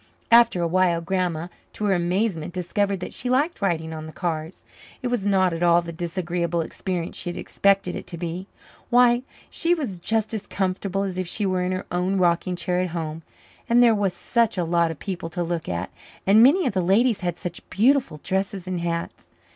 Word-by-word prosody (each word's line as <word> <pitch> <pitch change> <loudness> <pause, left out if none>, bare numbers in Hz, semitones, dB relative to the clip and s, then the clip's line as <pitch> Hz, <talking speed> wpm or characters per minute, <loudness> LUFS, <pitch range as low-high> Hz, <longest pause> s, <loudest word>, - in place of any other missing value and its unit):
After 230 -6 +6
a - - +2
while 175 -1 +2
Grandma, 175 -1 -1 0.3
to 210 - -3
her 200 - +3
amazement, 175 -1 -1
discovered 195 +2 -1
that - - -5
she 245 - -3
liked 285 +5 +1
riding 160 -4 -1
on 155 0 -6
the - - -8
cars. 165 -1 -4 0.4
It 250 - 0
was 235 -5 -1
not 190 -3 +3
at 165 - -4
all 175 0 +4
the 170 - -6
disagreeable 170 0 -2
experience 175 +1 -4
she - - -5
had 175 - -5
expected 195 -2 +1
it - - -7
to 170 - -6
be. 175 +2 -5 0.4
Why, 245 0 +5 0.3
she 345 +1 +2
was 240 - -4
just 220 +4 -1
as 215 -2 -4
comfortable 195 0 -1
as 185 -2 -3
if 185 - -2
she 205 +4 -2
were 185 -1 +1
in 180 - -1
her 185 0 -3
own 180 +2 0
rocking 180 0 +2
chair 180 0 -1
at 185 - -1
home! 160 0 -4 0.5
And 240 +1 +6
there 235 -2 +6
was 200 -4 0
such 235 -4 +1
a 180 - +1
lot 170 0 +2
of 160 - -5
people 175 -1 -5
to 175 +2 -2
look 170 -1 -3
at, 85 -1 -3 0.3
and 205 +3 +6
many 300 +10 +6
of 250 - 0
the 190 - +1
ladies 205 +5 +3
had 175 -2 -2
such 175 -2 -7
beautiful 245 - +2
dresses 190 -1 -2
and 185 -1 -3
hats. 170 0 -4
185 Hz, 210 wpm, -24 LUFS, 170-205 Hz, 0.5 s, After